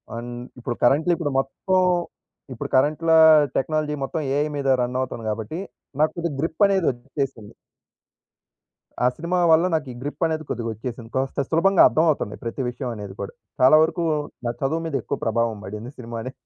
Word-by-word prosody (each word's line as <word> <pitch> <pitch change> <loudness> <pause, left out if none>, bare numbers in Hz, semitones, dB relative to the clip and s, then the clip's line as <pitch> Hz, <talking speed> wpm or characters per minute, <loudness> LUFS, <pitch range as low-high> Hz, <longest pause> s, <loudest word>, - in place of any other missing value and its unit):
అన్ 120 +1 -6 0.3
ఇప్పుడు 120 0 -3
కరంట్లీ 150 +8 +4
ఇప్పుడు 165 -4 -2
మొత్తం, 185 +8 0 0.7
ఇప్పుడు 120 - -6
కరంట్‌లా 155 +4 +3 0.4
టెక్నాలజీ 155 +1 0
మొత్తం 160 +4 -3
ఏఐ 150 +1 +1
మీద 140 -1 -2
రన్నవుతోంది 125 -2 -3
గాబట్టి, 110 +9 -4 0.4
నాకు 155 - +3
కొద్దిగ 170 -2 -2
గ్రిప్పనేది 190 +3 +2
ఒచ్చేసింది. 130 -3 -5 1.5
ఆ - - +6
సినిమా 175 +3 -1
వల్ల 160 +2 +5
నాకీ 150 -5 -1
గ్రిప్పనేది 155 +3 -2
కొద్దిగొచ్చేసింది. 115 +1 -5
కాస్త 135 +2 0
సులభంగా 180 +4 +4
అర్థమవుతంది, 150 -4 +1
ప్రతి 120 +3 -4
విషయం 125 +1 -5
అనేది 100 -2 -7
కూడా. 100 - -6 0.3
చాలా 130 +4 +7
వరుకూ 170 +2 -1 0.4
నా - - +1
చదువు 160 +5 0
మీదెక్కువ 140 -7 -2
ప్రభావం 115 0 0
బడింది 105 +5 -7
సినిమానే. 115 0 -6
135 Hz, 140 wpm, -23 LUFS, 120-160 Hz, 1.5 s, చాలా